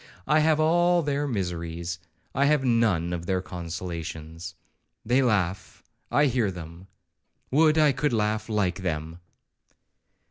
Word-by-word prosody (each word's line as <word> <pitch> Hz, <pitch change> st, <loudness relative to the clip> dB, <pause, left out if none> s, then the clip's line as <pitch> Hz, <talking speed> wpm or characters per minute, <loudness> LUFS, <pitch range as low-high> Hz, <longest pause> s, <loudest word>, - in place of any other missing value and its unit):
I 150 Hz, +3 st, +3 dB
have 155 Hz, 0 st, +3 dB
all 175 Hz, +2 st, +3 dB
their 145 Hz, 0 st, -1 dB
miseries,—I 90 Hz, -, -4 dB
have 145 Hz, -2 st, +2 dB
none 110 Hz, -8 st, +2 dB
of 85 Hz, 0 st, -5 dB
their 95 Hz, -1 st, +1 dB
consolations. 85 Hz, -1 st, -6 dB, 0.5 s
They 125 Hz, +4 st, +3 dB
laugh,—I 105 Hz, +5 st, -1 dB
hear 120 Hz, -6 st, +1 dB
them; 85 Hz, 0 st, -9 dB, 0.6 s
would 155 Hz, +3 st, +4 dB
I 155 Hz, -2 st, +5 dB
could 145 Hz, +2 st, 0 dB
laugh 110 Hz, -1 st, -1 dB
like 100 Hz, -3 st, 0 dB
them.' 80 Hz, -1 st, -3 dB
95 Hz, 115 wpm, -26 LUFS, 85-140 Hz, 0.6 s, I